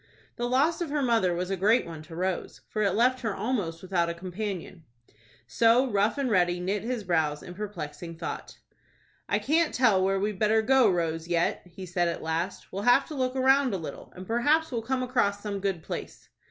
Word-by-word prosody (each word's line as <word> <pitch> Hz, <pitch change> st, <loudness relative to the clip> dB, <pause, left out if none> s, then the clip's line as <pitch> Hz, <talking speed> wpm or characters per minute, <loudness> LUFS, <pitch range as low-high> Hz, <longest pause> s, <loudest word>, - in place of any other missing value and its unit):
The 240 Hz, 0 st, -2 dB
loss 290 Hz, +8 st, +2 dB
of 340 Hz, -, -2 dB
her 290 Hz, -1 st, 0 dB
mother 225 Hz, -8 st, +2 dB
was 180 Hz, +2 st, -3 dB
a -, -, +1 dB
great 210 Hz, +6 st, +3 dB
one 165 Hz, -2 st, -8 dB
to 160 Hz, +1 st, -11 dB
Rose, 185 Hz, +1 st, -3 dB
for 215 Hz, -, -2 dB
it 200 Hz, -3 st, +2 dB
left 250 Hz, +3 st, +3 dB
her 225 Hz, -4 st, -2 dB
almost 195 Hz, -7 st, -2 dB
without 180 Hz, -2 st, 0 dB
a 170 Hz, -, -3 dB
companion. 185 Hz, -1 st, -5 dB, 0.6 s
So 230 Hz, -, +3 dB
Rough 205 Hz, +5 st, +2 dB
and 280 Hz, -2 st, 0 dB
Ready 175 Hz, -3 st, +2 dB
knit 190 Hz, +3 st, -1 dB
his 235 Hz, -1 st, -3 dB
brows 160 Hz, -5 st, 0 dB
in 175 Hz, -, -9 dB
perplexing 170 Hz, -4 st, -6 dB
thought. -, -, -6 dB, 0.7 s
"I -, -, +2 dB
can't 320 Hz, +2 st, +1 dB
tell 215 Hz, -7 st, +4 dB
where 195 Hz, 0 st, +1 dB
we'd 205 Hz, -1 st, -2 dB
better 220 Hz, +1 st, +3 dB
go, 260 Hz, -2 st, +5 dB
Rose, 165 Hz, -2 st, -1 dB
yet," 170 Hz, -1 st, +1 dB
he 185 Hz, +2 st, -9 dB
said 175 Hz, 0 st, 0 dB
at 170 Hz, -, -3 dB
last. 165 Hz, +4 st, -3 dB
"We'll 195 Hz, -, -3 dB
have 245 Hz, +5 st, +5 dB
to -, -, -6 dB
look 255 Hz, -2 st, -1 dB
round 265 Hz, -3 st, +3 dB
a -, -, -1 dB
little, 165 Hz, -, -8 dB
and 185 Hz, -, -8 dB
perhaps 290 Hz, -, +2 dB
we'll 235 Hz, -2 st, -1 dB
come 255 Hz, +3 st, -1 dB
across 205 Hz, -5 st, 0 dB
some 205 Hz, -2 st, -3 dB
good 190 Hz, -4 st, -2 dB
place." -, -, -7 dB
200 Hz, 205 wpm, -27 LUFS, 175-245 Hz, 0.7 s, go